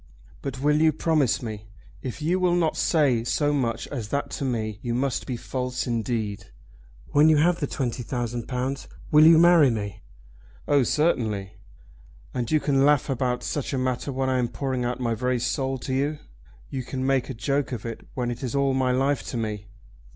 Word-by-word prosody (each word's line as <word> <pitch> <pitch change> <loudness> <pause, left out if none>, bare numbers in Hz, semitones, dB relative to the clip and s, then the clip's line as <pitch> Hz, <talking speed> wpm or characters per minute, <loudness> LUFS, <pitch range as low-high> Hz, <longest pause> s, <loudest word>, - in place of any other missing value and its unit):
"But 135 -3 -5
will 150 +2 +2
you 160 0 +5
promise 155 -6 +1
me? 110 -2 -6 0.3
If 130 +4 -6
you 175 +4 +1
will 180 -1 +2
not 165 -3 +1
say 140 -8 +2
so 145 +4 +1
much 115 -5 -1
as 120 -7 -4
that 140 +6 -2
to - - -4
me 110 -5 -2
you 120 -1 -2
must 135 +1 -1
be 125 - -3
false 125 0 -3
indeed. 115 -4 -2 0.6
When 150 +2 +5
you 155 - +5
have 170 +3 +3
the 145 - -1
twenty 125 -2 -3
thousand 120 -1 -3
pounds 130 +2 -3 0.2
will 155 0 +8
you 165 0 +8
marry 170 -4 +6
me?" 105 -4 -4 0.7
"Oh, 145 -1 +4
certainly." 110 - 0 0.8
"And 120 -2 -2
you 155 - +3
can 135 -2 +2
laugh 145 -1 +3
about 125 -1 -1
such 145 -1 -3
a - - 0
matter 130 +2 -1
when 135 0 -1
I 130 -1 +1
am 120 - +1
pouring 130 -1 -3
out 125 +1 -2
my 120 -2 0
very 125 +2 0
soul 130 +2 -1
to 130 +1 -4
you? 145 +3 0 0.5
You 135 - -2
can 130 +1 -4
make 135 -2 +1
a - - -4
joke 140 +4 -1
of 120 -4 -5
it 115 -1 -5
when 125 -2 -1
it 120 - -6
is 130 0 -3
all 140 -1 +2
my 130 -1 +1
life 135 +3 +1
to 125 - -4
me! 105 -2 -3
130 Hz, 200 wpm, -25 LUFS, 120-145 Hz, 0.8 s, will